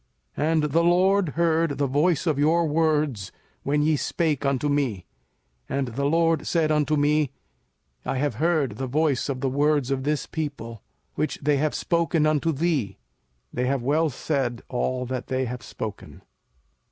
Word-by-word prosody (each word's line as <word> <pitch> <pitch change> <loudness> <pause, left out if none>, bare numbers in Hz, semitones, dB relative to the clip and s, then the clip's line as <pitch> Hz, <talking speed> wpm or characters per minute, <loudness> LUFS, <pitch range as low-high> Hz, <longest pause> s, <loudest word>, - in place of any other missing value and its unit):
05:005:028 150 - 0
And 160 -2 +2
the 155 +3 +2
LORD 185 +1 +3
heard 165 -1 +1
the 145 - +1
voice 150 +4 +1
of 155 -4 +1
your 165 +3 +3
words, 150 - 0 0.3
when 150 +1 +1
ye 155 0 +3
spake 155 0 -1
unto 140 +1 0
me; 135 -11 -1 0.6
and 135 -2 -1
the 135 +4 -2
LORD 165 +1 +2
said 160 -3 +1
unto 150 0 +2
me, 150 0 +2 0.7
I 135 - -2
have 145 0 0
heard 155 -10 +1
the 130 - -3
voice 145 0 0
of 130 -2 -3
the 135 - +1
words 145 -1 +1
of 135 -1 0
this 150 +2 -1
people, 140 - -5 0.3
which 155 - -2
they 145 0 +3
have 150 +2 0
spoken 170 -2 +1
unto 155 +1 +2
thee: 140 - -1 0.6
they 125 +1 -1
have 135 -2 0
well 155 +5 +2
said 130 -3 -2
all 125 0 -1
that 125 0 -4
they 130 0 -1
have 125 0 -5
spoken. 105 -3 -8
145 Hz, 165 wpm, -25 LUFS, 130-160 Hz, 0.7 s, LORD